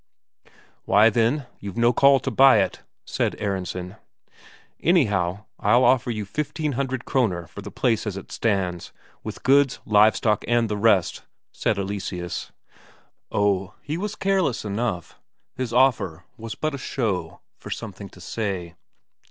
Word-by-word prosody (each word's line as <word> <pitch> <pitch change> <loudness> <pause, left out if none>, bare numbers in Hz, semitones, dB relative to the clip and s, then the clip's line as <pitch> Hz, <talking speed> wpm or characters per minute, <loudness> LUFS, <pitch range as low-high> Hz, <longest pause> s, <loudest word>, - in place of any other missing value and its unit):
"Why, 110 +2 +5
then, 120 +6 +1
you've 100 -2 -7
no 120 +1 +4
call 140 +2 +5
to 135 - -3
buy 135 +1 +6
it," 100 - 0 0.2
said - - -1
Aronsen. 95 0 -4 0.8
"Anyhow, 105 - +1
I'll 120 +5 +4
offer 130 -1 +3
you 110 -3 -3
fifteen 150 - -3
hundred 130 -1 -3
Kroner 95 -10 0
for 85 - -10
the - - -8
place 115 -3 0
as 100 -2 -3
it 95 - -10
stands, 95 -6 -1 0.3
with - - -7
goods, 135 0 +4
live 105 +1 +5
stock, 105 -3 +1
and 120 -2 +2
the 105 - -1
rest," 100 -4 +2 0.3
said 105 - -1
Eleseus. 95 -3 -4 0.8
Oh, 100 -1 0
he 150 - -3
was 205 +4 -4
careless, 190 - 0
enough; 100 -4 -3 0.3
his 125 -2 -4
offer 115 -10 +2
was 110 -1 -7
but 155 +4 -2
a 140 - -5
show, 95 -11 -3 0.2
for - - -10
something 100 -3 -7
to - - -16
say. 90 -3 -4
110 Hz, 145 wpm, -24 LUFS, 95-130 Hz, 0.8 s, buy